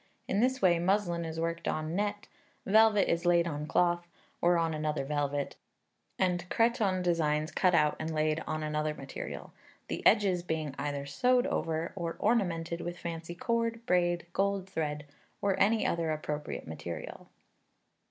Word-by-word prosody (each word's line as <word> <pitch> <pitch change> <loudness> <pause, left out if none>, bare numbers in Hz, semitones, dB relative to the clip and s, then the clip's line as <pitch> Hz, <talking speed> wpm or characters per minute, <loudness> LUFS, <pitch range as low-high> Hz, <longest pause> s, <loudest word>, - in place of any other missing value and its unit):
In 195 - 0
this 260 +1 +1
way 175 -2 +5
muslin 175 -2 +1
is 160 0 -5
worked 170 0 -2
on 155 +2 -2
net, 205 +1 -2 0.4
velvet 215 0 +5
is 170 0 +1
laid 175 -1 +4
on 150 -2 -4
cloth, 175 +1 +2 0.3
or 175 0 +4
on 165 -1 +1
another 150 -2 -1
velvet, 145 -1 -2 0.6
and 180 -1 0
cretonne 215 -5 +2
designs 155 -3 +1
cut 180 -2 +3
out 150 -2 +3
and 160 +1 -3
laid 155 0 +1
on 155 0 -2
another 150 0 -1
material, 135 -2 -7 0.4
the - - -3
edges 190 -4 +4
being 160 -4 -3
either 140 0 -2
sewed 250 - +2
over, 165 0 -1
or 170 -3 -3
ornamented 175 -7 0
with 175 +1 -5
fancy 170 0 -6
cord, 230 +3 -1
braid, 175 -2 +2
gold 195 -1 0
thread, 150 -5 -3 0.3
or 200 -2 +1
any 220 +3 +3
other 165 -1 0
appropriate 150 -1 -3
material. 80 +2 -7
170 Hz, 150 wpm, -31 LUFS, 155-195 Hz, 0.6 s, way